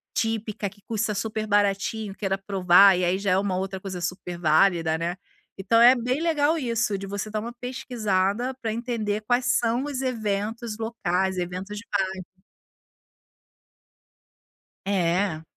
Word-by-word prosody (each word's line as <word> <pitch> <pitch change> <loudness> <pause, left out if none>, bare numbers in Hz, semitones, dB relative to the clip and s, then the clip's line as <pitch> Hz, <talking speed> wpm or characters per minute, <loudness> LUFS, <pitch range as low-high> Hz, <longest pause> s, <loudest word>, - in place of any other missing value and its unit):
típica, 220 -2 -1
que 205 +1 -22
custa 220 -1 -1
super 215 +1 -2
baratinho, 205 0 0
queira 195 -2 -1
provar, 195 -1 +5
e 180 - 0
aí 180 +2 +1
já 200 -2 0
é 185 - +4
uma 195 -2 0
outra 190 0 -3
coisa 190 -2 -6
superválida, 170 -1 +1
né. 170 +3 -3 0.4
Então 230 +4 +3
é 245 +2 +8
bem 250 +5 -1
legal 320 -1 +2
isso, 230 -6 0
de 195 - -6
você 200 +2 -4
dar 215 - -2
uma 235 +1 -6
pesquisada 240 -2 -1
pra 225 -2 -2
entender 225 -3 -2
quais 245 +3 +1
são 235 +2 0
os 275 -3 -3
eventos 220 -2 -2
locais, 190 -5 -1
eventos 185 +4 -4
de 225 - -8
bairro. 190 -2 -1 2.6
É. 180 -3 0
205 Hz, 145 wpm, -25 LUFS, 190-230 Hz, 2.6 s, é